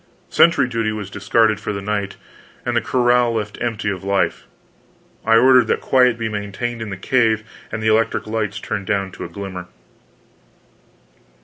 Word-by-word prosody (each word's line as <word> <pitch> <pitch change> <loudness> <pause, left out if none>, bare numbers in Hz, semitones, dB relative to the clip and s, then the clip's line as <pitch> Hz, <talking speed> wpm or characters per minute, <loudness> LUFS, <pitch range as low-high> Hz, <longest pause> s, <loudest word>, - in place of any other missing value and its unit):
Sentry 165 -6 +4
duty 115 -3 -1
was 105 -2 -6
discarded 110 -2 +2
for 105 0 -4
the 100 - -4
night, 100 0 -3 0.5
and - - -1
the - - +3
corral 120 -1 +2
left 105 -1 -4
empty 115 -3 -2
of 95 -1 -6
life; 100 0 0 0.8
I 115 - +4
ordered 130 +1 +6
that - - +1
quiet 125 -3 +3
be 115 -1 -2
maintained 110 +3 -4
in 110 - -5
the 95 - -5
cave, 110 0 +1 0.3
and 110 0 -4
the 110 - +3
electric 110 +1 +1
lights 110 -2 -2
turned 100 -3 -4
down 100 -2 -1
to - - -7
a - - -8
glimmer. 95 -1 -7
110 Hz, 170 wpm, -20 LUFS, 100-115 Hz, 0.8 s, ordered